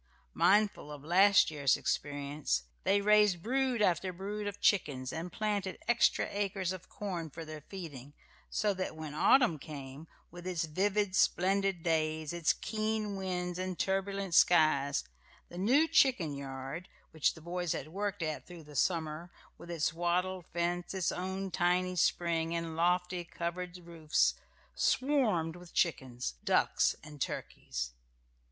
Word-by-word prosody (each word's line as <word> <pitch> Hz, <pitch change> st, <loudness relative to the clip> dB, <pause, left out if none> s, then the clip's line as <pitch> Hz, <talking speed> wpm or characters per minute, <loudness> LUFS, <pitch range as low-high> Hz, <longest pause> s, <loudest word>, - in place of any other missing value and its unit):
Mindful 195 Hz, -3 st, +3 dB
of 145 Hz, -1 st, -9 dB
last 190 Hz, +3 st, +5 dB
year's 140 Hz, -3 st, +2 dB
experience, 145 Hz, -, -1 dB, 0.2 s
they 200 Hz, +1 st, +3 dB
raised 210 Hz, -4 st, +4 dB
brood 255 Hz, -2 st, +1 dB
after 185 Hz, 0 st, +1 dB
brood 205 Hz, +3 st, -5 dB
of 205 Hz, 0 st, -5 dB
chickens, 135 Hz, -10 st, +1 dB
and 165 Hz, +2 st, -5 dB
planted 205 Hz, -2 st, -2 dB
extra 240 Hz, 0 st, +3 dB
acres 195 Hz, -3 st, -1 dB
of 185 Hz, -1 st, -8 dB
corn 180 Hz, -6 st, -4 dB
for 165 Hz, +3 st, -8 dB
their 155 Hz, -1 st, -8 dB
feeding, 145 Hz, -6 st, -9 dB, 0.4 s
so 210 Hz, -1 st, +1 dB
that 185 Hz, -3 st, -4 dB
when 155 Hz, -2 st, -7 dB
autumn 215 Hz, -, +4 dB
came, 140 Hz, +1 st, -9 dB, 0.2 s
with 175 Hz, +1 st, -9 dB
its 175 Hz, -3 st, -1 dB
vivid, 195 Hz, +4 st, 0 dB
splendid 195 Hz, -1 st, +2 dB
days, 155 Hz, -1 st, 0 dB
its 170 Hz, -3 st, +2 dB
keen 215 Hz, -1 st, -2 dB
winds 180 Hz, -2 st, -3 dB
and 185 Hz, -1 st, -3 dB
turbulent 195 Hz, -1 st, -1 dB
skies, 155 Hz, -5 st, +4 dB, 0.5 s
the 175 Hz, -, -10 dB
new 265 Hz, -, +4 dB
chicken 195 Hz, -, +3 dB
yard, 135 Hz, +5 st, -6 dB, 0.2 s
which 160 Hz, -2 st, +1 dB
the -, -, -11 dB
boys 175 Hz, 0 st, -2 dB
had -, -, -5 dB
worked 200 Hz, +1 st, -3 dB
at 155 Hz, -1 st, -4 dB
through 175 Hz, -2 st, -10 dB
the 150 Hz, -1 st, -14 dB
summer, 160 Hz, +2 st, 0 dB, 0.3 s
with 175 Hz, -, -11 dB
its 165 Hz, -1 st, 0 dB
wattled 175 Hz, +1 st, -1 dB
fence, 175 Hz, +2 st, -2 dB
its 185 Hz, -2 st, 0 dB
own 190 Hz, +1 st, -4 dB
tiny 180 Hz, +1 st, +1 dB
spring, 170 Hz, -1 st, +1 dB
and 165 Hz, -1 st, -3 dB
lofty 180 Hz, +1 st, +1 dB
covered 175 Hz, +1 st, -5 dB
roofs, 170 Hz, -3 st, +1 dB, 0.4 s
swarmed 225 Hz, -, +1 dB
with 175 Hz, -1 st, -13 dB
chickens, 130 Hz, -, 0 dB
ducks, -, -, +2 dB
and 150 Hz, -2 st, -11 dB
turkeys. -, -, -4 dB
175 Hz, 145 wpm, -32 LUFS, 155-195 Hz, 0.5 s, last